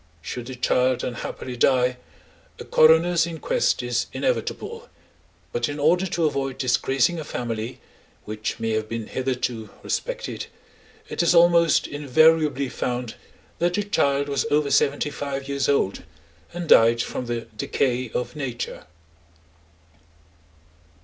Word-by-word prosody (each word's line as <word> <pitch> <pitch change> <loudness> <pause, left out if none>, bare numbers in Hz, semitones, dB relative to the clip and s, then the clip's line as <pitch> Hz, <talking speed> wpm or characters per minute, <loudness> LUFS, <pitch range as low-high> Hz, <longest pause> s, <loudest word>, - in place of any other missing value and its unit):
Should 120 +9 -6
the 130 - -6
child 125 0 +1
unhappily 125 +1 -5
die, 125 0 +2 0.6
a - - -9
coroner's 165 +2 +5
inquest 320 - 0
is - - -1
inevitable, 470 -1 -3 0.6
but 120 +2 -1
in 145 - -4
order 175 +6 +3
to 170 -2 0
avoid 135 -3 -1
disgracing 135 +5 +1
a - - -4
family 120 -3 -4 0.5
which 105 +1 -4
may 115 0 -1
have 110 0 -1
been 115 -1 -4
hitherto 125 -3 -3
respected, - - -3 0.6
it - - -2
is 170 0 +3
almost 170 -1 +5
invariably 145 0 +3
found 125 -2 -3 0.5
that 175 +1 +1
the 205 - 0
child 140 -8 +1
was 140 +1 -1
over 145 -1 +1
seventy 145 +1 +2
five 140 -1 -4
years 140 0 -1
old, 120 -9 +1 0.5
and 175 -1 -5
died 115 -2 +6
from 125 - -5
the 120 -1 -2
decay 125 +2 -1
of 120 +2 -4
nature. 125 -5 -5
135 Hz, 130 wpm, -24 LUFS, 125-160 Hz, 0.6 s, died